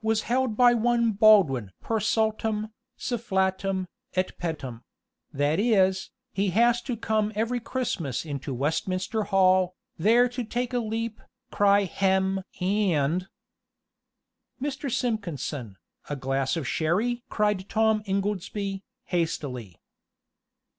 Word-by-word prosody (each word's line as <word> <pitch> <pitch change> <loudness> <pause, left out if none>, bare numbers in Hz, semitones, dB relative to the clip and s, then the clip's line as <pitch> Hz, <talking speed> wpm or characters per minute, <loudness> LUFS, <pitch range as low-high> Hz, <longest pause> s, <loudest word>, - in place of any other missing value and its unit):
was 220 0 +1
held 245 -2 0
by 245 -1 +6
one 235 0 +2
Baldwin 195 - +5
per 225 -1 -1
saltum, 220 0 0 0.3
sufflatum, 190 -4 -1 0.3
et 185 0 0
pettum; 140 -9 -4 0.5
that 145 +5 +1
is, 190 -4 +2 0.2
he 195 0 +1
was 240 +1 +4
to 245 -1 -4
come 215 -1 0
every 230 +3 0
Christmas 200 - -3
into 140 -2 -5
Westminster 185 - -1
Hall, 185 -2 +3 0.2
there 230 +7 +5
to 245 0 -4
take 245 +2 -3
a 245 - +2
leap, 225 0 -3 0.3
cry 205 -1 +4
hem! 190 0 +1 0.2
and 180 -3 +1 0.6
" - - -55
"Mr. 275 0 -3
Simpkinson, 155 - -3 0.3
a 145 - -2
glass 135 +3 -1
of 150 -6 -3
sherry?" 215 - 0
cried 210 -3 0
Tom 220 -1 +2
Ingoldsby, 195 0 -2 0.2
hastily. 135 - -3
200 Hz, 115 wpm, -26 LUFS, 175-225 Hz, 0.6 s, by